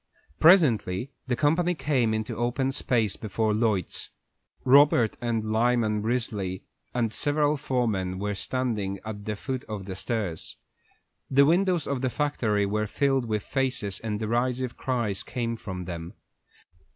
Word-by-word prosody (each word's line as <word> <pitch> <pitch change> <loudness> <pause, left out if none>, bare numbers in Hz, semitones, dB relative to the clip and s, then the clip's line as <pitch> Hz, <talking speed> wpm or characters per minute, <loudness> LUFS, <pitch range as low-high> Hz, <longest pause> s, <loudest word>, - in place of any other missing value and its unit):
Presently 135 - +4 0.2
the 125 - +1
company 165 +6 +2
came 130 -5 +1
into 110 +1 -2
the 110 - -7
open 125 +3 0
space 115 -6 0
before 110 0 -1
Lloyd's. 105 -4 0 0.6
Robert 130 -4 +5
and 115 -2 -1
Lyman 110 -2 +2
Risley 105 -5 -2 0.3
and 115 -3 -1
several 145 0 +1
foremen 110 -10 -1
were 105 +1 -2
standing 105 -3 -2
at 105 -2 -6
the 105 - -2
foot 130 +4 -4
of 105 -3 -6
the 95 -1 -5
stairs. 95 -4 -3 0.7
The 140 +1 +5
windows 175 +1 +2
of 140 -3 -2
the 130 - +1
factory 120 -8 0
were 105 +1 -1
filled 135 +2 +1
with 105 -2 -1
faces, 130 -7 -1
and 105 -2 -3
derisive 120 +3 -1
cries 120 -7 -1
came 115 -2 -3
from 95 -5 -6
them. 85 -1 -7
115 Hz, 140 wpm, -27 LUFS, 105-130 Hz, 0.7 s, Robert